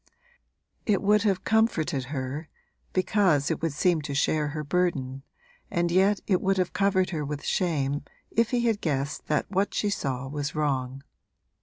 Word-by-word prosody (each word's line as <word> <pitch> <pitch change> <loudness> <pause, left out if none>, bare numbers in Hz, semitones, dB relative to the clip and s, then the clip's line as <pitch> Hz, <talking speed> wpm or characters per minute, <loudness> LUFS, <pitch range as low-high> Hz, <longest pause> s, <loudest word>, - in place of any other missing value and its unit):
It 205 -3 +2
would 210 +1 +4
have 195 -3 +1
comforted 175 - +1
her 140 +3 -4 0.4
(because 185 -6 +2
it - - -2
would 165 -3 -1
seem 170 +1 +2
to 145 -1 -4
share 150 +1 +2
her 150 +1 -4
burden) 145 -5 -1 0.5
and 170 0 0
yet 195 +3 +3
it 185 -3 +2
would 195 0 +1
have 185 -2 0
covered 190 -1 +2
her 155 -4 -2
with 145 0 -5
shame 145 -7 0 0.3
if 230 0 +2
he 245 -1 +1
had 225 -3 +1
guessed 140 -2 -2
that 150 - +1
what 195 +1 0
she 205 - +1
saw 135 -7 -2
was 145 +2 -4
wrong. 135 -3 -1
160 Hz, 165 wpm, -27 LUFS, 140-195 Hz, 0.5 s, would